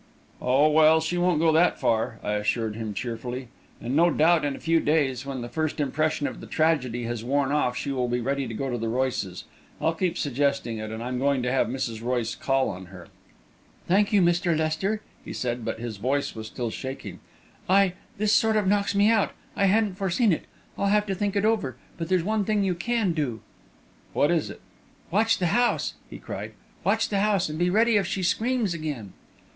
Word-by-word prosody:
"Oh, 135 +4 +4
well, 155 +1 +6
she 160 +2 -1
won't 175 -2 +2
go 165 0 +4
that 165 +3 +3
far," 115 0 0
I - - -2
assured 105 +1 -1
him 110 -2 -5
cheerfully; 120 +2 -5 0.3
"and 120 +3 -3
no 170 +3 +5
doubt 165 +1 +3
in 145 -1 -1
a - - -10
few 165 0 +2
days, 140 -4 +1
when 135 -2 -4
the 120 - -5
first 155 +4 -2
impression 150 +1 0
of - - -4
the - - -9
tragedy 135 -7 +1
has 115 -1 -4
worn 140 +2 +1
off, 135 -4 +1
she 140 - -3
will 125 -2 0
be 120 0 0
ready 135 +2 -1
to 115 - -6
go 135 +5 -2
to 120 - -2
the 115 - -2
Royces'. 120 -7 -2 0.4
I'll 165 - +1
keep 175 +1 -1
suggesting 140 -4 0
it, 110 0 -5
and 110 +1 -5
I'm 125 +1 -3
going 140 -1 +1
to 125 - 0
have 130 -3 +2
Mrs. 120 -3 -3
Royce 120 -1 -1
call 135 -1 +1
on 95 -2 -7
her." 90 -2 -12 0.8
"Thank 200 +3 +3
you, 200 -3 +4
Mr. 175 -1 +2
Lester," 160 +8 -1 0.2
he - - -7
said, 120 -1 -3
but - - -3
his 115 -3 -5
voice 135 +7 -1
was 110 -1 -7
still 120 0 -4
shaking. 130 +3 -6 0.5
"I 195 -1 +4 0.2
this 210 +1 +2
sort 220 -1 +3
of 210 - +1
knocks 200 0 +1
me 200 +1 +5
out 220 -2 +2 0.2
I 200 - +2
hadn't 200 -1 +2
foreseen 195 +2 +2
it. - - -3 0.3
I'll 200 - +1
have 210 +1 +3
to 195 - -2
think 200 +1 -2
it 200 +1 +2
over. 215 - +1 0.2
But 165 0 -4
there's 185 -3 +2
one 215 +2 0
thing 210 0 +1
you 190 -2 +1
can 210 +1 0
do." 135 -8 -2 0.7
"What 145 - +3
is 170 -3 +1
it?" - - -10 0.5
"Watch 220 +4 +3
the 180 - -1
house!" 240 0 +2 0.2
he - - -8
cried. - - -7 0.3
"Watch - - +1
the 200 - 0
house! 200 -4 +2
And 155 +1 -5
be 175 +1 +2
ready 220 +3 +4
if 195 -3 +1
she 190 0 -2
screams 225 +2 +1
again." 145 - -5
155 Hz, 215 wpm, -26 LUFS, 125-190 Hz, 0.8 s, well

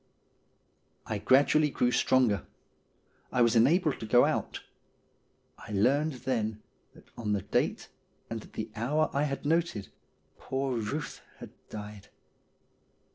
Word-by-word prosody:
I 110 - -3
gradually 145 +6 +4
grew 125 -3 +1
stronger. 125 -7 +2 0.8
I 125 - +3
was 115 0 +3
enabled 150 +6 +3
to 110 - -6
go 120 +3 +6
out. - - -2 1.0
I - - -10
learned 140 +10 +2
then 110 -4 -1 0.3
that - - -19
on 105 -3 -2
the 100 -2 -1
date 100 - -1 0.4
and 115 -1 -5
at - - -17
the 110 0 -5
hour 145 +8 0
I 140 +2 +1
had 135 -1 -4
noted 160 - 0 0.5
poor 130 -3 -2
Buth 145 +9 -4 0.2
had - - -10 0.2
died. 105 -1 -8
120 Hz, 130 wpm, -29 LUFS, 110-145 Hz, 1.0 s, go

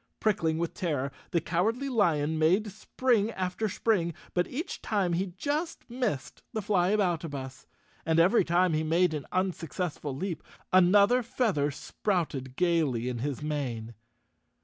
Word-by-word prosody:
| - - -52
Prickling 170 -7 +1
with 170 0 -2
terror, 145 -6 -2 0.2
the 170 - +2
Cowardly 215 - 0
Lion 160 - +1
made 190 +7 +3
spring 220 +1 +1
after 185 +4 -2
spring, 185 -5 0 0.2
but 175 0 +1
each 320 +7 -5
time 195 -5 0
he 185 +3 0
just 300 - -2
missed 240 - -3
the 220 - -1
Flyaboutabus. 175 -9 0 0.4
And 160 0 +2
every 185 +6 +5
time 175 0 +2
he 155 - +1
made 165 +2 +2
an 145 -4 -4
unsuccessful 175 -5 -2
leap, 175 +3 -3 0.3
another 200 +7 +6
feather 215 - 0
sprouted 145 -4 -2
gaily 155 -9 +1
in 120 -2 -4
his 140 +3 -3
mane. 125 -7 -3
175 Hz, 140 wpm, -29 LUFS, 150-205 Hz, 0.4 s, another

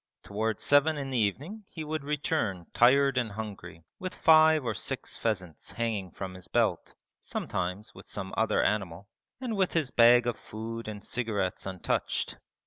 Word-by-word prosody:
Towards 110 +1 -2
seven 145 +2 +4
in 135 -2 -4
the 130 - 0
evening 145 - -2
he 160 - -6
would 155 -1 -3
return 140 - -1
tired 135 +2 +5
and 115 -4 -2
hungry 95 -6 -7 0.2
with 185 -1 -5
five 155 -3 +6
or 115 - 0
six - - -4
pheasants 95 -8 -3
hanging 110 -5 -2
from 95 +1 -6
his 90 -1 -10
belt - - 0 0.2
(sometimes 95 +3 -4
with - - -13
some 95 -2 -6
other 110 0 +2
animal) 100 -2 -1 0.3
and 250 -4 -3
with 190 -2 +1
his 155 -6 +1
bag 120 +1 +6
of 120 -2 -2
food 115 +1 -6
and 105 -1 -7
cigarettes 105 -7 -2
untouched. 95 -2 -2
115 Hz, 160 wpm, -29 LUFS, 100-145 Hz, 0.3 s, five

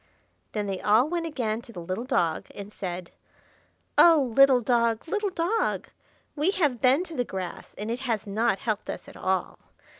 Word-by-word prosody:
Then 210 -1 -1
they 195 -2 -3
all 220 +6 +4
went 335 0 -2
again 235 -7 -2
to 235 - -14
the 180 - -8
little 185 +7 -4
dog, 175 - 0
and 200 +1 -8
said,— 180 -2 -5 0.9
"Oh, 300 -8 +6
little 275 -2 +7
dog, 235 +1 +1
little 420 +3 0
dog! 370 +6 -1 0.5
we 300 +4 +1
have 295 - +1
been 265 +6 +4
to 335 -3 -9
the 245 - +1
grass, 190 -6 -7
and 210 +3 -4
it 240 - -2
has 230 -6 -2
not 215 +1 +1
helped 215 0 -3
us - - -6
at - - -12
all. 190 -1 -2
235 Hz, 180 wpm, -26 LUFS, 205-295 Hz, 0.9 s, little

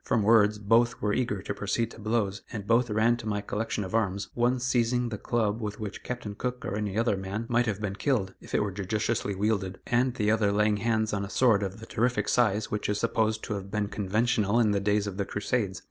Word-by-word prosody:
From 110 -3 +1
words 105 -1 +5
both 115 +4 +2
were 105 -1 0
eager 105 -6 -1
to - - -3
proceed 105 +3 -1
to - - -12
blows, 105 -2 -1
and 105 -5 -5
both 115 +2 +3
ran 110 +3 +3
to 110 - -7
my 105 -1 0
collection 105 +1 -3
of 95 - -7
arms, 100 -3 0
one 120 +2 +1
seizing 125 -1 +1
the 110 - -4
club 115 -2 0
with 105 -1 -4
which 105 -2 -6
Captain 120 -4 -5
Cook 125 +4 -4
or 100 - -2
any 105 -1 -2
other 115 -2 +2
man 95 +4 -4
might 120 0 +2
have 105 -2 -1
been 105 -2 -2
killed, 105 -6 0
if - - -6
it - - +3
were 105 - -2
judiciously 105 +2 -1
wielded, 100 -2 -1
and 125 +1 +1
the 105 -3 +1
other 110 -2 +2
laying 105 0 +2
hands 110 0 0
on 100 -1 -1
a 100 - -5
sword 115 -3 +3
of 100 +1 -4
the 110 - -9
terrific 115 -2 0
size 110 -4 +2
which 105 -1 -2
is 105 - 0
supposed 110 -1 0
to 105 - -3
have 100 -1 -5
been 105 0 -1
conventional 105 +2 +1
in 110 -3 +3
the 100 - +1
days 105 +1 +1
of 100 -2 -5
the 100 - -1
Crusades. 105 -1 -2
105 Hz, 240 wpm, -28 LUFS, 100-115 Hz, -, words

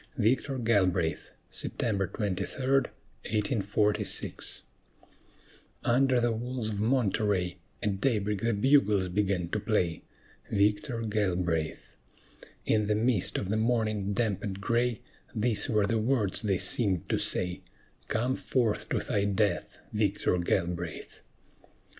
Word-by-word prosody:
VICTOR 130 +4 +1
GALBRAITH 95 -8 +1 0.2
[September 100 -4 -1
23, 100 +7 -3
1846] 105 -6 0 1.2
Under 130 +1 +3
the 120 0 +2
walls 120 0 -3
of 100 -1 -3
Monterey 105 -6 +1 0.3
At 100 -2 -1
daybreak 105 -5 0
the 115 -1 +1
bugles 105 -6 +3
began 95 -2 0
to 105 - -1
play, 90 -6 0 0.5
Victor 105 +4 +1
Galbraith! 90 -7 -1 0.7
In 105 -1 +2
the 105 - +2
mist 110 -3 +1
of 95 - -3
the 110 - +1
morning 110 -3 0
damp 105 -3 0
and 100 -2 -4
gray, 120 +2 0 0.3
These 110 0 +2
were 105 -3 +3
the 115 +2 0
words 110 -4 +1
they 100 -4 +1
seemed 95 -7 +1
to - - +1
say: 90 -1 -1 0.5
"Come 125 +4 0
forth 120 -7 -1
to - - 0
thy 100 -1 0
death, 100 +1 0 0.2
Victor 105 -3 +1
Galbraith!" 85 -1 -2
105 Hz, 115 wpm, -29 LUFS, 95-115 Hz, 1.2 s, Under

